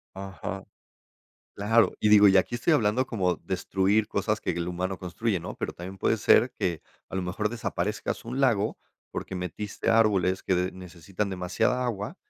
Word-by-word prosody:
Ajá. 95 0 -6 0.9
Claro, 110 +3 +3
y 105 - +2
digo, 105 -1 +8
y 95 -1 +6
aquí 105 +6 +1
estoy 140 +7 +2
hablando 120 0 +2
como 95 -7 0
destruir 95 +3 0
cosas 105 -1 -1
que - - -1
el 85 0 -3
humano 90 +1 -3
construye, 95 +3 -2
¿no?, - - -7
pero - - -3
también 95 +2 -8
puede - - +2
ser - - +4
que, 85 -4 -1 0.3
a - - -6
lo 95 - 0
mejor, 100 +4 -2
desaparezcas 105 -3 -3
un 125 +3 -4
lago, 110 -6 +2 0.3
porque 95 - -5
metiste 90 +5 -4
árboles 100 -5 +3
que 95 - 0
de 90 +1 0
necesitan 90 +2 -5
demasiada 95 +8 0
agua, 105 -4 -3
100 Hz, 170 wpm, -27 LUFS, 90-110 Hz, 0.9 s, digo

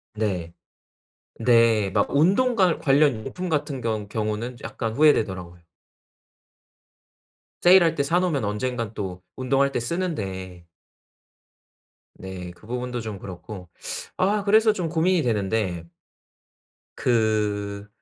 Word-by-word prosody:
네. 90 -6 -2 0.9
네. 115 -3 +4
막 - - +1
운동 195 - +3
관 185 -5 +3
관련 140 -6 +3
용품같은 155 -6 -2
경 110 -3 -2
경우는 110 +3 -3
약간 115 -2 -4
후회되더라고요. 95 - +2 2.0
세일할 175 -2 +6
때 140 - +1
사 165 +5 +2
놓으면 165 -9 0
언젠간 115 +1 -2
또 95 -4 -5
운동할 135 +2 +1
때 135 - -1
쓰는데. 95 - -4 1.5
네. 95 -2 -7
그 90 +4 -18
부분도 125 0 -3
좀 110 -3 -6
그렇고. 90 0 -9 0.5
아 200 +2 +1
그래서 215 +2 +5
좀 180 -5 -3
고민이 170 +2 +2
되는데 100 -6 -1 1.1
그 105 -3 0
115 Hz, 215 characters per minute, -24 LUFS, 100-155 Hz, 2.0 s, 세일할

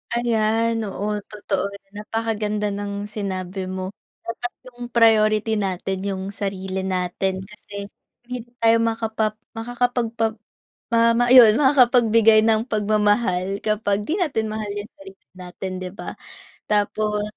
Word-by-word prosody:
Ayan, 225 -1 +1
oo, 210 +2 -2
totoo. 205 -1 -3 0.2
Napakaganda 210 0 -2
ng 200 0 -4
sinabi 190 -2 -4
mo. 185 0 -4 0.3
Dapat 240 +1 -4 0.2
yung 245 0 -8
priority 220 -2 +3
natin 190 -1 -2
yung 190 0 -3
sarili 190 -2 -4
natin 190 0 -2
kasi 200 0 -9 0.3
hindi 245 -1 -7 0.2
tayo 230 0 +5
makapa 225 -1 -1 0.2
makakapagpa 230 -1 -1 0.6
ma 230 +1 +4
ayun 240 -3 +8
makakapagbigay 240 -5 +5
ng 220 0 +3
pagmamahal 205 -2 +1
kapag 210 -1 0
di 325 - 0
natin 265 -11 0
mahal 215 -1 -4
yung 205 +1 -5
sarili 195 0 -14
natin 185 +1 -7
'di 180 - -5
ba? - - -7 0.5
Tapos 210 0 0
215 Hz, 115 wpm, -22 LUFS, 200-230 Hz, 0.6 s, ayun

